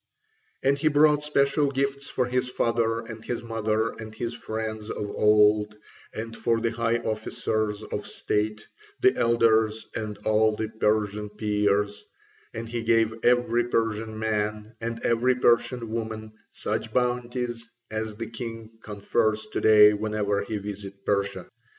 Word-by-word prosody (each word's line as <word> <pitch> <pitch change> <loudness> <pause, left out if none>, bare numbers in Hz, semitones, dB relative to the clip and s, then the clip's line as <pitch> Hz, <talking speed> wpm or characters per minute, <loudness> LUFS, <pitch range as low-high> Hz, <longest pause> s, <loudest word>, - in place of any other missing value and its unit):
And 140 +1 +2
he 155 - +2
brought 150 0 +4
special 140 -1 +2
gifts 140 0 -2
for 125 - 0
his 125 +1 -1
father 115 -2 0
and 110 -1 -9
his 120 0 -4
mother 110 -1 0
and 110 0 -9
his 120 +1 -3
friends 110 -2 -5
of 105 -1 -4
old, 105 0 +4 0.3
and 115 +1 -6
for 115 -1 +1
the 115 0 0
high 115 0 +1
officers 110 -1 -2
of - - -5
state, 105 +1 -2 0.3
the 385 0 +4
elders, 110 -2 +3
and 105 -2 -4
all 110 0 +3
the 110 0 -3
Persian 105 -1 0
Peers; 105 -1 0 0.5
and 115 +1 -6
he 120 0 -3
gave 115 -1 +3
every 120 -1 +3
Persian 110 -2 -1
man 110 0 -2
and 115 0 -4
every 120 +2 +3
Persian 120 -1 +2
woman 110 -1 -4 0.2
such 110 +1 -3
bounties 120 -1 -1 0.2
as 110 0 -3
the 115 +1 -5
king 115 -1 -7
confers 110 +1 0
to - - -1
day 105 -1 +7
whenever 105 -1 -1
he 105 +1 -3
visits 100 -1 -7
Persia. 100 -1 -1
110 Hz, 145 wpm, -26 LUFS, 105-120 Hz, 0.5 s, day